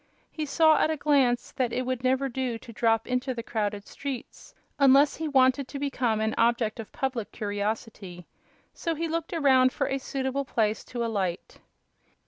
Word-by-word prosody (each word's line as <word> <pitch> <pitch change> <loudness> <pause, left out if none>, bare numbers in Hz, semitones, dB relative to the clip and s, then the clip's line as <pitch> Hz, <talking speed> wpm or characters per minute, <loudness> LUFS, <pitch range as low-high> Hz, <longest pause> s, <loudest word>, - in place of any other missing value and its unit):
He 310 -2 -4
saw 315 +1 +4
at - - +3
a 315 - -1
glance 275 -5 +2
that 250 -3 -1
it 255 +1 -2
would 255 -1 -3
never 260 +2 +2
do 255 -2 -3
to 230 +1 -12
drop 225 0 +2
into 250 +1 -2
the 230 - -5
crowded 205 -3 -3
streets, 275 -4 -7 0.2
unless 280 +1 +5
he 320 - -3
wanted 260 -1 +3
to 280 - -7
become 255 -6 0
an 220 0 0
object 230 -1 +1
of 220 - -7
public 255 -5 -3
curiosity; 205 -3 -4 0.5
so 330 -1 -3
he 330 +2 -2
looked 330 0 -3
around 265 -5 +4
for 275 - -1
a 270 - -1
suitable 265 +1 -2
place 220 -4 0
to 240 -2 -3
alight. 195 -6 -3
255 Hz, 175 wpm, -27 LUFS, 225-275 Hz, 0.5 s, unless